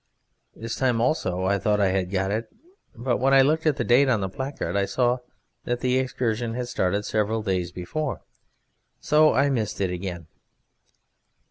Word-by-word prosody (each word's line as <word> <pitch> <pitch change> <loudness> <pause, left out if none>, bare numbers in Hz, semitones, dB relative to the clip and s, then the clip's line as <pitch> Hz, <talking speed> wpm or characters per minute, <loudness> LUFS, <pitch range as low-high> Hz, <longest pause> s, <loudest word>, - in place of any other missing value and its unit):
This 115 +1 -5
time 125 -3 +1
also 95 - 0
I 100 +1 +1
thought 105 +2 +1
I 100 -2 +3
had 95 -1 -1
got 95 0 -1
it, 110 +2 -3 0.4
but 120 +1 -1
when 135 +1 +3
I 135 - +7
looked 155 +3 +1
at 150 - +3
the 120 - 0
date 130 +4 +4
on 120 -4 +2
the 95 -1 -2
placard 135 +2 -4
I 100 0 +2
saw 120 +5 +1 0.5
that 120 0 -2
the 130 0 +2
excursion 120 -3 -2
had 125 -1 -4
started 100 +1 0
several 110 +1 0
days 90 -4 -1
before, 130 - -4 0.8
so 155 0 +4
I 140 +1 +3
missed 110 -6 -2
it 95 -2 0
again. 90 -2 -5
115 Hz, 175 wpm, -25 LUFS, 95-130 Hz, 0.8 s, I